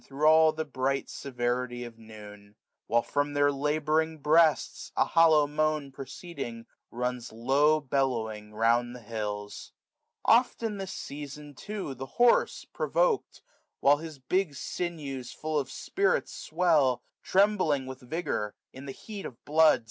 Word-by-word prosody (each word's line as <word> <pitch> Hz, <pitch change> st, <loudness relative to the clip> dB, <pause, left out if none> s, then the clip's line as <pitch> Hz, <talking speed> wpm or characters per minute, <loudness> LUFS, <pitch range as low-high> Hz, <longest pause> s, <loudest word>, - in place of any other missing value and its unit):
Thro' 145 Hz, +3 st, 0 dB
all 160 Hz, 0 st, +6 dB
the 155 Hz, 0 st, -4 dB
bright 135 Hz, -1 st, -2 dB
severity 120 Hz, -1 st, -2 dB
of 115 Hz, -1 st, -10 dB
noon; 105 Hz, -2 st, -13 dB, 0.3 s
While, 120 Hz, 0 st, +2 dB
from 145 Hz, 0 st, -1 dB
their 145 Hz, 0 st, +4 dB
labouring 155 Hz, +3 st, 0 dB
breasts, 155 Hz, 0 st, +2 dB
a -, -, +4 dB
hollow 160 Hz, -2 st, +5 dB
moan 150 Hz, -1 st, -1 dB
Proceeding, 135 Hz, -4 st, -7 dB, 0.2 s
runs 125 Hz, 0 st, -3 dB
low^bellowing 130 Hz, -4 st, +1 dB
round 120 Hz, +3 st, +1 dB
the 125 Hz, -, -10 dB
hills. 105 Hz, -2 st, -5 dB, 0.5 s
595 230 Hz, -, +8 dB
Oft 245 Hz, -1 st, -9 dB
in 215 Hz, -2 st, -2 dB
this 190 Hz, -1 st, -5 dB
season 145 Hz, +1 st, -8 dB
too 200 Hz, -1 st, -5 dB
the 135 Hz, +1 st, -7 dB
horse, 240 Hz, 0 st, +3 dB
provok'd. -, -, 0 dB, 0.4 s
While 145 Hz, +1 st, +5 dB
his 160 Hz, -1 st, -8 dB
big 155 Hz, +4 st, -1 dB
sinews 140 Hz, -6 st, -5 dB
full 155 Hz, -1 st, -1 dB
of 135 Hz, -2 st, -4 dB
spirits 400 Hz, -, 0 dB
swell; 155 Hz, -7 st, +2 dB, 0.2 s
Trembling 185 Hz, -9 st, +2 dB
with 130 Hz, 0 st, -8 dB
vigour, 125 Hz, -6 st, -3 dB, 0.2 s
in 135 Hz, +2 st, -10 dB
the -, -, -4 dB
heat 205 Hz, +4 st, -7 dB
of 125 Hz, -, -15 dB
blood. 155 Hz, -2 st, +5 dB
140 Hz, 140 wpm, -28 LUFS, 125-160 Hz, 0.5 s, 595